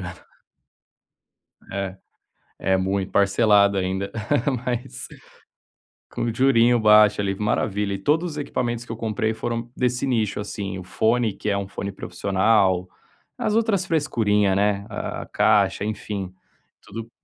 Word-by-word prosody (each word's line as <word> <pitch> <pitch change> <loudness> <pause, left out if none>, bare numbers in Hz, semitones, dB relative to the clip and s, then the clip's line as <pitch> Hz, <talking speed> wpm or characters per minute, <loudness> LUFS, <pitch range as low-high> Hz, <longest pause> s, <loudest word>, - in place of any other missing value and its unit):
engano. - - -7 1.5
É. 95 -1 -3 0.7
É 95 0 +3
muito 95 +1 -1
parcelado 100 0 +4
ainda, 95 +1 -2 0.5
mas 125 -1 -4 1.0
com - - -6
um 115 -1 -1
jurinho 120 -1 +4
baixo 105 -1 +6
ali, 100 -1 -1
maravilha. 105 0 -1
E - - -2
todos 160 - +1
os 150 - -8
equipamentos 120 -5 -3
que - - -8
eu - - -8
comprei 110 -1 -1
foram 115 +1 -4
desse 125 +1 0
nicho, 110 -6 0
assim. 100 -2 -5
O - - -8
fone, 110 +3 +1
que 105 - -4
é 100 - +1
um 100 -1 -3
fone 100 0 -5
profissional. 95 0 +1 0.5
As 210 - -1
outras 215 -5 +1
frescurinha, 105 - +1
né, 100 0 +1
a 100 - -5
caixa, 100 -2 +2
enfim, 100 -3 -4 0.5
tudo 115 +3 -8
105 Hz, 135 wpm, -23 LUFS, 100-120 Hz, 1.5 s, baixo